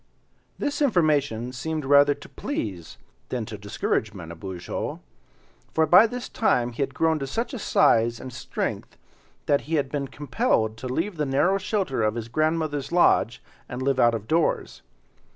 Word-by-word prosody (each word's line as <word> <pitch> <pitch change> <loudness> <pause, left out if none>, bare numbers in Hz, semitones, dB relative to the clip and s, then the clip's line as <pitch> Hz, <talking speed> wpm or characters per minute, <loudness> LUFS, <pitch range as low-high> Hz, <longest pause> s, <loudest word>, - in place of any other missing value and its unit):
This 290 +1 -2
information 150 - +2
seemed 155 +4 -3
rather 145 +1 +5
to - - -13
please 100 - -5 0.3
than 120 -3 -2
to 110 - -7
discourage 105 +1 -2
Manabozho, 90 +1 -6 0.8
for 160 - +4
by 180 +8 +7
this 245 +2 -6
time 125 - +1
he 120 - -6
had 135 -1 -2
grown 160 -1 +2
to 135 - -4
such 230 - -3
a 255 - -4
size 115 - +3
and 130 -1 -8
strength 120 - -4 0.5
that 140 -1 +2
he 165 - +1
had 140 -3 0
been 140 -2 -2
compelled 115 -6 0
to 130 - -6
leave 165 +9 -2
the 150 - 0
narrow 175 +9 +2
shelter 190 - -1
of 110 0 +1
his 115 -1 -5
grandmother's 155 +1 -1
lodge 170 -8 +3 0.3
and 125 +1 -4
live 135 -1 +1
out 120 -1 +5
of 110 -1 -6
doors. 165 +1 0
140 Hz, 165 wpm, -25 LUFS, 115-160 Hz, 0.8 s, by